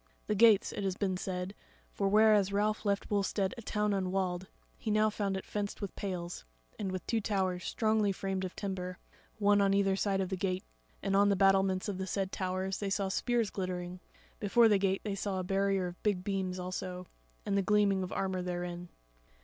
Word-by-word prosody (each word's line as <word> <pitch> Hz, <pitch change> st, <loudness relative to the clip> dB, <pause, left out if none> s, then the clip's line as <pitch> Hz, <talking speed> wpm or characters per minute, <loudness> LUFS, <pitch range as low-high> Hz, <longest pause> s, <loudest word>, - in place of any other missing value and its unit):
The 215 Hz, -, 0 dB
gates, 215 Hz, -1 st, +5 dB
it 205 Hz, -, -4 dB
has 190 Hz, -2 st, 0 dB
been 190 Hz, -3 st, 0 dB
said; 180 Hz, +1 st, -4 dB, 0.4 s
for 200 Hz, -1 st, 0 dB
whereas 210 Hz, -1 st, +5 dB
Ralph 210 Hz, +2 st, 0 dB
left 200 Hz, +1 st, 0 dB
Wulstead 195 Hz, -1 st, +1 dB
a 235 Hz, -, -8 dB
town 210 Hz, -1 st, 0 dB
unwalled, 185 Hz, -1 st, -1 dB, 0.3 s
he 225 Hz, -, -5 dB
now 215 Hz, 0 st, +3 dB
found 200 Hz, -2 st, -1 dB
it 190 Hz, -, -6 dB
fenced 205 Hz, -1 st, -3 dB
with 200 Hz, -3 st, -5 dB
pales, 180 Hz, -, -4 dB, 0.4 s
and 195 Hz, -2 st, -2 dB
with 185 Hz, -2 st, -4 dB
two 230 Hz, -2 st, 0 dB
towers 190 Hz, -3 st, -1 dB
strongly 215 Hz, -2 st, +2 dB
framed 190 Hz, 0 st, -3 dB
of 185 Hz, -, -5 dB
timber, 185 Hz, -2 st, -4 dB, 0.4 s
one 205 Hz, -1 st, +4 dB
on 195 Hz, 0 st, +3 dB
either 195 Hz, -1 st, +3 dB
side 195 Hz, 0 st, 0 dB
the 190 Hz, -, -2 dB
gate, 185 Hz, 0 st, -1 dB, 0.4 s
and 195 Hz, -, +1 dB
on 200 Hz, +1 st, +5 dB
the 200 Hz, -, +3 dB
battlements 195 Hz, 0 st, +3 dB
of 195 Hz, -2 st, -3 dB
the 190 Hz, -, -3 dB
said 195 Hz, 0 st, -1 dB
towers 185 Hz, +1 st, -2 dB
they 200 Hz, -, -2 dB
saw 195 Hz, 0 st, 0 dB
spears 235 Hz, +2 st, 0 dB
glittering; 180 Hz, -1 st, -4 dB, 0.4 s
before 225 Hz, +3 st, +5 dB
the 205 Hz, -3 st, +4 dB
gate 195 Hz, 0 st, +1 dB
they 205 Hz, -, -2 dB
saw 195 Hz, 0 st, -2 dB
a -, -, -2 dB
barrier 195 Hz, 0 st, +1 dB
of 175 Hz, 0 st, -7 dB
big 200 Hz, -4 st, 0 dB
beams 190 Hz, -2 st, -2 dB
also, 180 Hz, 0 st, -5 dB, 0.4 s
and 200 Hz, -, 0 dB
the 200 Hz, -, +3 dB
gleaming 200 Hz, -1 st, +3 dB
of 185 Hz, -, -4 dB
armour 190 Hz, -1 st, -1 dB
therein. 175 Hz, -1 st, -4 dB
195 Hz, 200 wpm, -32 LUFS, 185-205 Hz, 0.4 s, gates